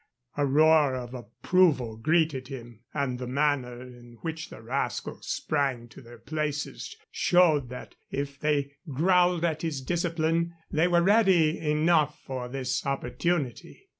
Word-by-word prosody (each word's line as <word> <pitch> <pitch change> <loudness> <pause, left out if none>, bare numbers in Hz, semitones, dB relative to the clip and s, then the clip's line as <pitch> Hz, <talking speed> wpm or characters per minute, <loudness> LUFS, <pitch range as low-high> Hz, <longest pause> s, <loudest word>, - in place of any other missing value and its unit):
A 145 -1 +1
roar 150 -1 +4
of 125 -1 -6
approval 125 - +1
greeted 155 +1 +1
him, 120 -5 -9
and 135 -4 -2
the 125 - -5
manner 130 -3 0
in 120 -1 -14
which 160 -2 -5
the - - -11
rascals 120 0 -3
sprang 135 -6 -1
to - - -13
their 120 -1 -13
places 145 - -4
showed 160 -8 +3
that, 125 - -9 0.2
if 140 0 -4
they 145 -2 0 0.2
growled 175 +3 +3
at 160 -2 -1
his 160 -4 -2
discipline, 170 +2 -1 0.2
they 160 +3 +3
were 175 -1 +3
ready 190 -6 +4
enough 155 0 +2
for 130 -2 -4
this 130 0 -2
opportunity. 140 -1 -3
145 Hz, 135 wpm, -27 LUFS, 125-165 Hz, 0.2 s, roar